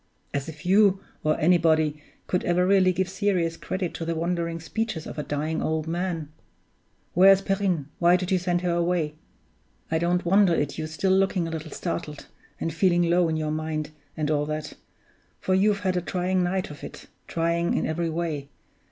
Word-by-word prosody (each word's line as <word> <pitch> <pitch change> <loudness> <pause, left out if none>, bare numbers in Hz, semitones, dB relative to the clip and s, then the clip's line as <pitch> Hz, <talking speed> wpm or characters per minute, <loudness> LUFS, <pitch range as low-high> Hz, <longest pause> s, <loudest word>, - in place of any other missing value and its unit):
As 140 +2 -2
if 155 +2 -11
you, 195 +1 +5 0.2
or 155 0 +1
anybody, 155 -3 +3 0.2
could 180 - -1
ever 175 +1 +2
really 190 -1 +4
give 185 +1 -1
serious 190 -4 0
credit 185 +1 -3
to - - -5
the 165 0 -2
wandering 170 0 -2
speeches 200 0 -3
of 150 - -6
a - - -2
dying 155 +3 -2
old 160 -1 -1
man! 170 -2 -2 0.8
(Where 190 +3 +7
is 195 0 +4
Perrine? 195 -7 0
Why 175 +1 +5
did 180 +1 -2
you 185 - +3
send 175 0 0
her 180 -1 0
away?) 170 -3 0 0.8
I 160 - +2
don't 175 +2 0
wonder 190 -1 +4
at 145 -2 -1
your 155 - -2
still 160 +5 0
looking 190 -2 +2
a - - -5
little 160 -1 -5
startled, 150 -2 -5 0.3
and 165 - -2
feeling 175 -1 +2
low 175 -1 +3
in 160 - 0
your 155 -1 -2
mind, 155 -1 -3 0.3
and 155 -1 0
all 150 -1 +1
that 155 -1 -4 0.7
for 190 - 0
you've 200 +1 +3
had 185 -2 0
a 180 - +1
trying 180 +1 0
night 180 -1 -1
of 145 - -11
it, - - -9 0.2
trying 170 +1 0
in - - 0
every 165 +1 -1
way. 160 -4 -3
170 Hz, 190 wpm, -25 LUFS, 155-185 Hz, 0.8 s, Where